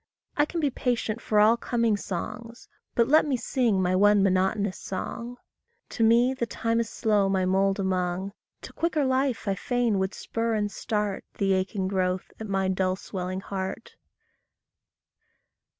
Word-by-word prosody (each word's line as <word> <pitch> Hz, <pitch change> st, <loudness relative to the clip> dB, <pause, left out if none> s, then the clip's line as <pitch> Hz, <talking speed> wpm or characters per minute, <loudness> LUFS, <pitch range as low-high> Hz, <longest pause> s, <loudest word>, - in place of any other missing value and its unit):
I 295 Hz, -, +3 dB
can 335 Hz, +2 st, -4 dB
be 290 Hz, -4 st, +1 dB
patient 235 Hz, -3 st, -1 dB
for 210 Hz, -, +1 dB
all 215 Hz, +2 st, +6 dB
coming 235 Hz, -3 st, +1 dB
songs, 215 Hz, +5 st, -6 dB, 0.3 s
But 235 Hz, -1 st, +3 dB
let 305 Hz, +3 st, +5 dB
me 275 Hz, -4 st, 0 dB
sing 235 Hz, -4 st, +1 dB
my 180 Hz, 0 st, +1 dB
one 205 Hz, +1 st, +5 dB
monotonous 190 Hz, +1 st, +1 dB
song. 235 Hz, +5 st, -5 dB, 0.5 s
To 230 Hz, -, -1 dB
me 235 Hz, +3 st, +5 dB
the 240 Hz, -3 st, -2 dB
time 230 Hz, +2 st, -1 dB
is 230 Hz, -1 st, -1 dB
slow 210 Hz, -4 st, +1 dB
my 190 Hz, -1 st, +1 dB
mould 195 Hz, +1 st, +2 dB
among; 185 Hz, 0 st, -1 dB, 0.3 s
To -, -, -9 dB
quicker 315 Hz, -4 st, 0 dB
life 260 Hz, -3 st, 0 dB
I 195 Hz, -, +2 dB
fain 235 Hz, 0 st, 0 dB
would 190 Hz, +1 st, -1 dB
spur 230 Hz, 0 st, -2 dB
and 205 Hz, -1 st, -1 dB
start 210 Hz, -3 st, -2 dB
The 195 Hz, -1 st, +2 dB
aching 190 Hz, +1 st, -1 dB
growth 185 Hz, -1 st, -1 dB
at 220 Hz, -, -5 dB
my 195 Hz, -1 st, +1 dB
dull 185 Hz, 0 st, +1 dB
swelling 185 Hz, -1 st, -5 dB
heart. 190 Hz, -1 st, -5 dB
210 Hz, 160 wpm, -26 LUFS, 190-235 Hz, 0.5 s, all